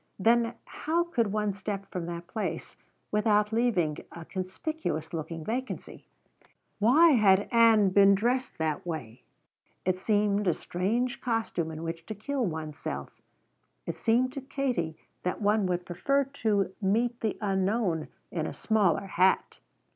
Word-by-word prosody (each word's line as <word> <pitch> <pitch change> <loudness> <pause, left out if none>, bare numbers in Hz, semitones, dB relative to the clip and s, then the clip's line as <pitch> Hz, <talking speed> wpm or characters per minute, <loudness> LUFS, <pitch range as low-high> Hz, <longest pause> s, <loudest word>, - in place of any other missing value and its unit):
Then 230 +3 +3
how 330 +3 -1
could 240 -12 0
one 210 -1 0
step 195 0 -4
from 175 -2 -4
that 170 0 -5
place 210 +5 -4 0.4
without 210 0 +2
leaving 190 -10 +1
a 170 -1 -9
conspicuous 185 - -4
looking 165 0 -5
vacancy? 255 +4 -5 0.7
Why 275 +11 +6
had 200 -6 +4
Ann 225 -4 +6
been 200 +1 +6
dressed 245 +6 0
that 160 -2 -1
way? 130 -9 -6 0.6
It 185 0 +1
seemed 205 0 +1
a 175 - +3
strange 235 +8 -1
costume 225 -9 -1
in 160 0 -6
which 165 0 -5
to 215 - -5
kill 265 +6 -2
one's 155 -6 -4
self. - - -4 0.8
It - - -3
seemed 250 +3 +2
to 275 - -5
Katie 250 - -2 0.2
that 180 - -2
one 210 -1 +2
would 180 0 -1
prefer 275 +11 +1
to 215 -8 0
meet 230 +5 +1
the 220 -3 -1
unknown 195 -4 0 0.2
in 160 -3 -2
a - - -5
smaller 205 -5 +1
hat. 190 0 +2
205 Hz, 145 wpm, -28 LUFS, 175-235 Hz, 0.8 s, Why